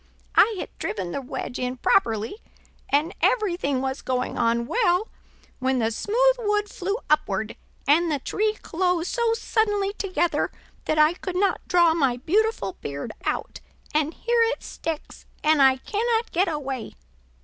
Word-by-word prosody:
I 445 0 +5
had - - -6
driven 190 -5 -3
the 280 - -3
wedge 250 -1 -5
in 250 0 -2
properly, 225 - +1 0.5
and 300 +6 +2
everything 350 - +1
was 265 0 -3
going 255 -1 -2
on 235 0 +1
well, 420 - +1 0.5
when 260 0 +1
the 225 -2 +1
smooth - - +2
wood 415 -2 +1
flew 395 +4 -2
upward, 220 -8 0 0.3
and 325 +4 +4
the 295 - +1
tree 425 - -1
closed 360 0 0
so 470 -2 +2
suddenly 415 -3 0
together 370 -4 0 0.4
that 310 - 0
I 305 +2 +5
could 365 0 -6
not 395 +2 +1
draw 345 -2 +5
my 270 -7 +1
beautiful 365 - 0
beard 140 0 -5
out, - - -2 0.3
and 305 +1 +1
here 475 0 +1
it 460 +2 +1
sticks 320 -2 -6 0.2
and 305 -1 +4
I 265 -1 +6
cannot 450 - -1
get 370 +3 +2
away. 275 -6 -4
330 Hz, 150 wpm, -25 LUFS, 260-415 Hz, 0.5 s, I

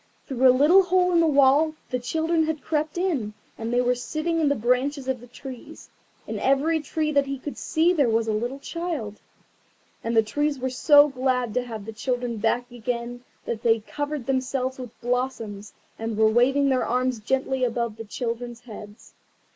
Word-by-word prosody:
Through 260 -1 +3
a - - +8
little 295 +9 +6
hole 365 0 +2
in 340 - +4
the 330 - +4
wall 285 +2 +4 0.2
the 250 - 0
children 320 +6 0
had 315 -2 -3
crept 310 0 -2
in, 285 - -1 0.2
and 225 +1 -5
they 245 +1 +3
were 250 0 +2
sitting 310 +7 -2
in 305 -3 +3
the 285 - +2
branches 255 +4 0
of 260 -1 -1
the 245 - -13
trees. 255 +1 -11 0.3
In - - -4
every 290 +5 +2
tree 305 +1 -2
that 280 -2 +2
he 275 0 -3
could 280 +2 -7
see 335 +2 +1
there 285 -8 +2
was 225 0 +1
a 220 - 0
little 240 +5 -2
child. 295 - -5 0.8
And 230 0 -1
the 225 - +6
trees 290 +6 -1
were 260 0 -3
so 290 +3 +6
glad 255 -4 -1
to 250 - +1
have 225 -4 -7
the 225 - -7
children 245 0 -2
back 240 +3 0
again 245 0 -4 0.2
that 225 -2 -3
they 230 -1 +5
had 220 -1 -11
covered 290 -3 -4
themselves 260 0 -1
with 245 -3 -9
blossoms, 235 -4 -3 0.3
and 225 -1 -3
were 220 0 +5
waving 270 +4 +3
their 260 -2 +2
arms 250 0 0
gently 265 +3 -1
above 235 -2 -1
the 225 - -6
children's 235 +1 -5
heads. 210 -2 -12
255 Hz, 195 wpm, -25 LUFS, 235-290 Hz, 0.8 s, a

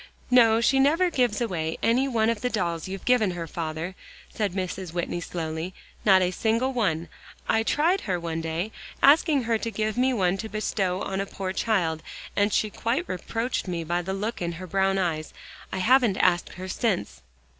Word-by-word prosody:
"No, 230 -2 +6
she 270 +3 +3
never 330 +6 +3
gives 245 -6 +1
away 165 -8 -2
one 230 -1 +2
of 230 - -4
the 250 - 0
dolls 170 -8 -2
you've 190 0 -6
given 245 -5 +4
her, 170 - -3
father," 160 +2 -4 0.4
said 205 -4 -1
Mrs. 185 -2 -4
Whitney 175 0 -2
slowly, 165 +1 -4 0.3
"not 190 -3 +6
a 180 - +1
single 230 +7 0
one. 170 -9 0 0.4
I 225 - +3
tried 330 +11 +2
her 180 -3 -1
one 165 -1 -3
day, 165 +6 -3 0.3
asking 290 -1 +5
her 225 -1 +1
to 230 - -3
give 215 +2 -2
me 260 +1 +3
one 190 -5 +1
to 220 +2 -5
bestow 195 -4 -1
on 195 0 -2
a 200 - -4
poor 190 -1 -4
child, 175 -8 0 0.3
and 205 +1 +2
she 215 +1 +1
quite 255 - -1
reproached 225 +5 -3
me 170 -2 -2
by 175 +2 -1
the 190 +2 -3
look 210 +3 -3
in 170 -1 -2
her 180 +3 -7
brown 195 +2 +1
eyes. 165 -4 -2 0.4
I - - -3
haven't 230 0 +4
asked 175 -1 +2
her 185 +1 -7
since." 190 - -1
195 Hz, 190 wpm, -26 LUFS, 175-230 Hz, 0.4 s, No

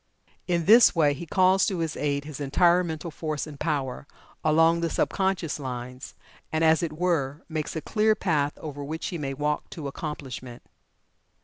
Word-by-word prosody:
In 170 -2 0
this 225 0 +7
way 150 -3 +4
he 165 +4 -8
calls 185 +2 +4
to 190 - -1
his 165 -2 -2
aid 140 -1 -1
his 150 -2 -8
entire 170 +6 +3
mental 160 0 -5
force 155 -1 -3
and 150 -3 -10
power, 140 -4 -2 0.4
along 165 +2 +4
the 165 - 0
sub - - 0
conscious 190 -6 -1
lines, 125 -1 -7 0.4
and, 160 +1 0
as 160 +1 +5
it 165 -3 -2
were, 155 -5 0
makes 155 -1 -4
a 160 - -2
clear 215 +4 +2
path 150 -8 0
over 145 -2 -7
which 160 +4 -4
he 175 - -5
may 135 -2 -3
walk 150 +1 -2
to 155 -4 -6
accomplishment. 135 -4 -7
155 Hz, 180 wpm, -26 LUFS, 145-170 Hz, 0.4 s, this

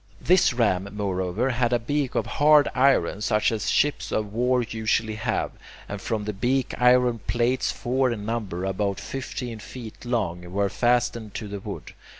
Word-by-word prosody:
This 185 -3 +4
ram, 100 -6 +1
moreover, 100 +4 -1
had 120 0 +1
a 120 - +4
beak 140 +3 -2
of - - +1
hard 150 0 +5
iron 130 -7 +3
such 105 +1 +2
as 110 -2 -2
ships 145 0 +1
of 105 -1 -2
war 125 +2 +2
usually 110 0 -1
have, 110 +1 -2 0.4
and 100 -1 -6
from 110 -3 -2
the 105 - -3
beak 125 +6 0
iron 125 -1 +4
plates, 120 +2 +1
four 130 +1 0
in 105 -4 -4
number, 105 -6 -3
about 100 +1 -1
fifteen 125 -3 -5
feet 115 0 -10
long, 90 -8 -2
were 100 +1 +1
fastened 120 -3 0
to 110 - -4
the 100 0 -5
wood. - - -8
115 Hz, 165 wpm, -25 LUFS, 105-125 Hz, 0.4 s, hard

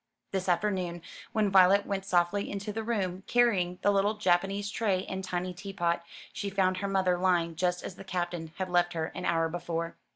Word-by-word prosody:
This 190 -1 -1
afternoon, 175 -2 0 0.3
when 215 -2 +1
Violet 190 +1 +6
went 195 -1 -3
softly 180 +3 +1
into 200 +1 -4
the 225 - -2
room, 195 -5 -2
carrying 195 -8 +2
the 205 - +5
little 200 +2 +2
Japanese 195 +1 +1
tray 200 -4 0
and 190 0 -4
tiny 180 0 -3
teapot, 175 -2 -2 0.3
she 200 - -3
found 190 -1 +1
her 200 +1 -2
mother 190 -2 +1
lying 175 -3 +2
just 180 +1 0
as - - -5
the - - -9
Captain 175 -3 -3
had 190 - -2
left 175 -1 +2
her 160 -1 -2
an - - -5
hour 165 -1 +2
before. 170 0 -3
185 Hz, 190 wpm, -29 LUFS, 175-200 Hz, 0.3 s, Violet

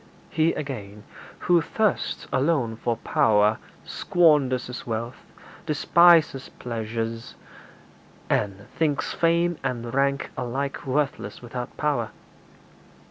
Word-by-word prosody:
He, 160 +1 +2
again, 105 -8 -6 0.4
who 175 -1 +4
thirsts 215 +3 -1
alone 130 -5 +1
for 115 0 -2
power 110 -6 +3 0.3
squanders 150 -7 +2
his 125 +1 -8
wealth, 115 +3 -5 0.4
despises 165 -2 +4
pleasure, 115 -1 -4 1.1
and 100 -1 -1
thinks 150 -3 -1
fame 170 0 +1
and 120 -3 -3
rank 140 +1 0
alike 135 +3 -3
worthless 140 -1 -2
without 120 +1 -6
power. 140 -7 0
130 Hz, 95 wpm, -25 LUFS, 115-155 Hz, 1.1 s, who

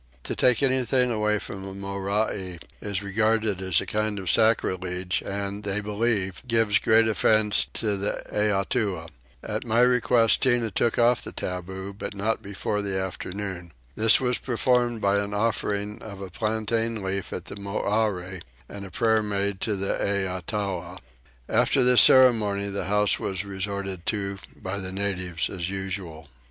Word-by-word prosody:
To - - -2
take 125 +2 +3
anything 130 -1 +2
away 105 -1 +1
from 100 -1 -7
a 95 0 -7
Morai 100 -1 -2 0.2
is 100 -1 -3
regarded 110 0 +1
as 95 -4 +2
a - - -5
kind 105 0 -1
of 95 -3 -1
sacrilege 95 -5 +1
and, 100 +1 -4
they 105 0 -2
believe, 105 -2 -1
gives 115 -2 +3
great 110 +1 +4
offence 110 -1 +3
to 105 -2 0
the 100 +1 -2
Eatua. 100 -4 0 0.3
At - - -3
my 115 0 +2
request 125 -2 +4
Tinah 120 -4 +2
took 115 - +1
off 120 0 +4
the - - -8
taboo, 95 +2 -5
but 100 +1 -7
not 110 +3 -1
before 100 +1 -3
the 100 -2 -2
afternoon. 95 -2 -5 0.2
This 110 0 +5
was 125 -2 +1
performed 120 -2 +1
by 100 0 +2
an 100 0 -3
offering 105 -1 -1
of 100 -3 -9
a 95 -2 -8
plantain 110 +1 -1
leaf 95 0 -3
at - - -5
the - - -8
Morai, 100 -2 -2 0.3
and 100 -1 -8
a - - -9
prayer 110 0 +2
made 100 -2 -1
to 110 -3 0
the 95 0 -1
Eatua. 95 -1 -2 0.5
After 135 - +3
this 125 0 +7
ceremony 105 -6 +5
the 100 0 -3
house 105 +1 +2
was 95 0 -3
resorted 95 -2 -4
to 100 -2 -2 0.2
by 95 +2 -5
the 95 -1 -5
natives 95 -3 -2
as 90 -2 -4
usual. 95 -5 -5
100 Hz, 155 wpm, -25 LUFS, 95-110 Hz, 0.5 s, this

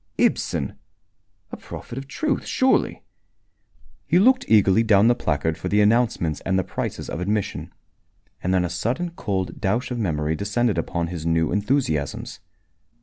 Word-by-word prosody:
Ibsen! 70 - 0 0.7
A - - -6
prophet - - -9
of 135 +1 -6
truth, 295 - -1
surely! 260 0 +1 1.0
He - - +3
looked 255 +7 +4
eagerly 105 -1 +5
down 105 -2 +4
the 120 - +6
placard 80 - -1
for - - -4
the 105 - +2
announcements 105 -7 +2
and 95 0 0
the 95 - +1
prices - - -4
of - - -4
admission. 100 +2 -2 0.7
And 90 - -1
then 90 -1 +2
a - - -2
sudden 125 - -2
cold 95 - -3
douche 115 +6 0
of 120 - -2
memory 80 -6 -1
descended 105 +4 0
upon 85 -1 -2
his 85 -3 -5
new 80 -1 +1
enthusiasms. 105 - -1
100 Hz, 150 wpm, -23 LUFS, 85-120 Hz, 1.0 s, the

